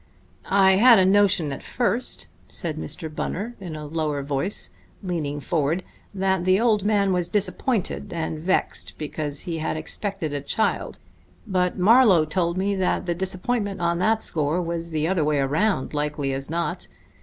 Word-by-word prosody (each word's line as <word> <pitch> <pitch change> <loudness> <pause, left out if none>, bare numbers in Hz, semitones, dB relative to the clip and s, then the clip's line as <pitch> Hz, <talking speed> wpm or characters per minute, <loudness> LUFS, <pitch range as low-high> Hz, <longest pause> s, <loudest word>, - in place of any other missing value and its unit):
I 190 -1 +5
had 235 +2 +8
a 190 - +5
notion 190 -6 +3
at - - -7
first," 240 0 0 0.2
said 160 -3 -4
Mr. 155 +1 -4
Bunner 210 +9 -3
in 175 -5 -7
a 150 -1 -6
lower 150 -2 -2
voice, 140 +8 -2 0.3
leaning 155 -6 -2
forward, 160 +2 0 0.3
"that 190 -2 0
the 185 +1 +3
old 220 -4 +2
man 200 -2 +2
was 175 -1 -1
disappointed 210 +1 -1
and 160 -2 -3
vexed 185 +4 -1
because 150 -1 -3
he 170 -3 -4
had 155 0 -2
expected 160 -1 -3
a 145 - -2
child; 215 +10 -1 0.5
but 180 -4 0
Marlowe 200 -4 +6
told 170 +2 -1
me 200 +2 0
that 185 -1 0
the 175 - 0
disappointment 195 +3 -2
on 170 0 0
that 220 +4 +2
score 155 +2 0
was 170 -1 -3
the 155 -1 -1
other 180 -3 +1
way 150 0 +1
around, 145 +4 0
likely 150 -2 -1
as 135 +1 -4
not. 170 -1 -2
175 Hz, 165 wpm, -24 LUFS, 155-195 Hz, 0.5 s, had